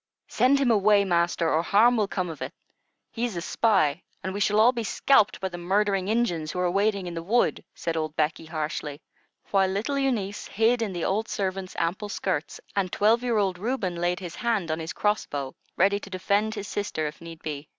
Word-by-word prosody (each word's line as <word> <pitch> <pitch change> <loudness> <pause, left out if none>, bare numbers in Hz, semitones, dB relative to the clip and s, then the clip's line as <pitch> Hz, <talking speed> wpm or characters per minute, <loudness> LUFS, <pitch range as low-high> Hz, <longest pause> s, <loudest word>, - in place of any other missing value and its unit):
"Send 260 +3 +3
him 270 -3 +2
away, 205 -1 +4
master, 170 -2 +1
or 160 - +3
harm 220 +7 +4
will 215 -3 +1
come 185 -2 -2
of 155 - -11
it. - - -4 0.6
He 230 - -4
is 240 -5 -1
a - - -2
spy, 185 -6 +2 0.2
and 190 - -3
we 200 - -3
shall 210 +1 +2
all 230 +3 +7
be 235 -2 -3
scalped 215 0 +3
by 190 - -2
the 175 -1 -7
murdering 195 +1 +1
Injuns 180 -9 0
who 180 - -4
are 180 -1 +1
waiting 200 0 +1
in 175 - -5
the 165 - -4
wood," 225 +8 +1
said 165 -1 -3
old 155 -1 -2
Becky, 155 +1 0
harshly; 155 -2 -4 0.5
while 195 -1 +3
little 225 +9 -1
Eunice 220 -7 -1
hid 230 +3 +2
in 220 -3 -1
the 175 -2 -3
old 215 +4 0
servant's 190 -2 -3
ample 180 +5 -1
skirts, 185 -6 -2 0.2
and 190 -3 0
twelve 220 +3 +3
year 240 -3 0
old 190 -3 0
Reuben 210 -5 -2
laid 175 +1 0
his 175 -3 -7
hand 215 -9 0
on 160 - -2
his 160 0 -4
cross 210 0 0
bow, 140 -2 -4 0.2
ready 200 +2 +3
to 200 - -10
defend 200 +4 0
his 205 -1 -5
sister 200 -6 -2
if 150 +1 -6
need 165 -1 -10
be. 145 -1 -5
195 Hz, 215 wpm, -26 LUFS, 170-215 Hz, 0.6 s, all